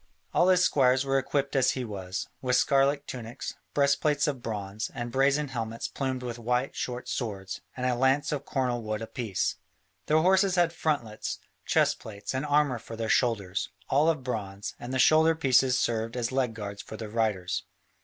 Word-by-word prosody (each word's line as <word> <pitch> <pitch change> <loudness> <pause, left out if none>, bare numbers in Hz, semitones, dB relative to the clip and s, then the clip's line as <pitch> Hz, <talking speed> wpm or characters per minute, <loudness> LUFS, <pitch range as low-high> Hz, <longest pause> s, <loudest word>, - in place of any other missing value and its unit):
All 175 - +4
his 180 -1 +5
squires 130 -3 +3
were 135 0 +2
equipped 140 +1 -1
as 130 -1 +4
he 125 - -2
was, 95 -3 -5
with 125 -1 +1
scarlet 140 +2 +3
tunics, 125 +1 -6 0.2
breastplates 145 +1 +3
of 135 -4 -2
bronze, 105 -1 -4
and 120 0 -4
brazen 140 +2 +2
helmets 115 -3 -3
plumed 130 -2 -3
with 120 -1 -5
white, 125 +3 0
short 125 0 -4
swords, 95 -6 -4 0.2
and 125 - -2
a 125 - +2
lance 135 +5 +2
of 145 -2 -2
cornel 125 -4 -1
wood 110 0 -3
apiece. 110 -4 -2 0.5
Their 155 - +4
horses 190 0 +4
had 175 -2 +3
frontlets, 125 -11 -2 0.3
chest - - +3
plates, 100 0 -6
and 130 +3 -2
armour 145 -4 +2
for 115 - -9
their 110 0 -3
shoulders, 100 -4 +1 0.2
all 145 +4 +4
of 155 -5 0
bronze, 100 -5 -4
and 120 - -6
the 130 - 0
shoulder 160 +4 +5
pieces 130 -4 +3
served 115 0 -1
as 120 0 -1
leg 130 -4 0
guards 100 -2 -6
for 110 +2 -9
the 110 - -5
riders. 105 -4 -1
125 Hz, 180 wpm, -28 LUFS, 110-140 Hz, 0.5 s, his